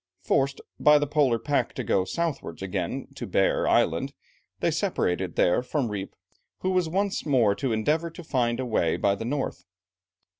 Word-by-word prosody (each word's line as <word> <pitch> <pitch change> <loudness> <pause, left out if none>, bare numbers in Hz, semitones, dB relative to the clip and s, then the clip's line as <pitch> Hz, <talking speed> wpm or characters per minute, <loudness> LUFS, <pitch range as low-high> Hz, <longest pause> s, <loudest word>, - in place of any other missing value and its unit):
Forced 135 0 +1 0.2
by 150 0 +6
the 145 - +1
Polar 145 -5 +2
pack 140 +5 -1
to 130 - -3
go 95 -3 +1
southwards 150 - -3
again 95 -2 -3
to - - -6
Bear - - +2
Island, - - +2 0.5
they - - +1
separated 90 -1 -1
there 90 +6 +3
from 125 -1 -1
Rijp, 100 -2 -5 0.5
who 185 - 0
was 180 -3 +1
once 195 +3 0
more 125 -9 +3
to 125 +4 -1
endeavour 150 +10 +1
to 170 +2 -10
find 120 -5 0
a 130 - -1
way 85 -9 +1
by 100 - +2
the 100 +3 -5
north. 140 +3 -3
125 Hz, 175 wpm, -26 LUFS, 100-150 Hz, 0.5 s, by